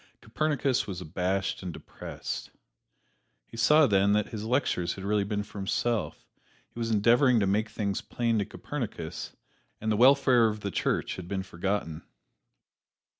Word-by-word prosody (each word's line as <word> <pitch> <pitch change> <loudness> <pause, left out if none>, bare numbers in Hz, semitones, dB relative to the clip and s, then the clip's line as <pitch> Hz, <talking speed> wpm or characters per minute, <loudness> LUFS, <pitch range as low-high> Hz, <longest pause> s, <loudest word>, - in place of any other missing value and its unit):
Copernicus 140 +1 0
was 95 -3 -5
abashed 90 +3 -2
and 90 -2 -5
depressed. - - -7 1.0
He - - -14
saw 150 +7 +5
then 100 -3 +3
that 105 -1 +1
his 110 -1 -5
lectures 115 -8 0
had 95 - -8
really 105 +1 +1
been 105 0 -2
for 105 0 -10
himself 100 -2 -1 0.5
he - - -10
was 115 -1 -1
endeavoring 120 +3 +4
to 100 - +2
make 105 +3 +1
things 100 -3 -2
plain 115 -2 -1
to 100 - 0
Copernicus, 110 - -6 0.4
and 110 0 -1
the - - +2
welfare 125 0 +5
of 105 -1 -3
the 100 - -3
Church - - -1
had 90 -2 -7
been 95 0 -2
forgotten. 90 -3 -3
105 Hz, 155 wpm, -28 LUFS, 95-120 Hz, 1.0 s, saw